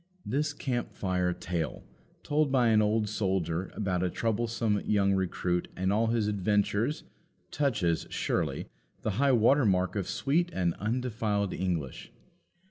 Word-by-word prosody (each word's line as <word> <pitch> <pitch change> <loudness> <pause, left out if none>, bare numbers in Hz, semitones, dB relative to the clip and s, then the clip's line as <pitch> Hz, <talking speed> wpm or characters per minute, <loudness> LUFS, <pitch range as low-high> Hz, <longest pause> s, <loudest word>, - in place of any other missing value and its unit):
This 145 +7 0
camp 120 -6 -3
fire 90 -2 0
tale, 85 -2 -3 0.4
told 150 -1 +1
by 125 -3 +4
an 110 -1 +5
old 105 0 +1
soldier, 95 -4 -1
about 95 -4 -1
a 90 - +1
troublesome 115 0 0
young 100 -2 +2
recruit 90 -2 -1
and 95 +1 +1
all 115 +2 +2
his 115 -1 +1
adventures, 105 - 0 0.5
touches, 105 - 0
surely, - - -1 0.4
the 110 - 0
high 140 -1 +5
water 125 +5 +4
mark 95 -3 +2
of 100 -3 -2
sweet 170 +5 +1
and 85 -2 +1
undefiled 110 -3 -1
English. 85 -8 -3
105 Hz, 135 wpm, -29 LUFS, 95-120 Hz, 0.5 s, an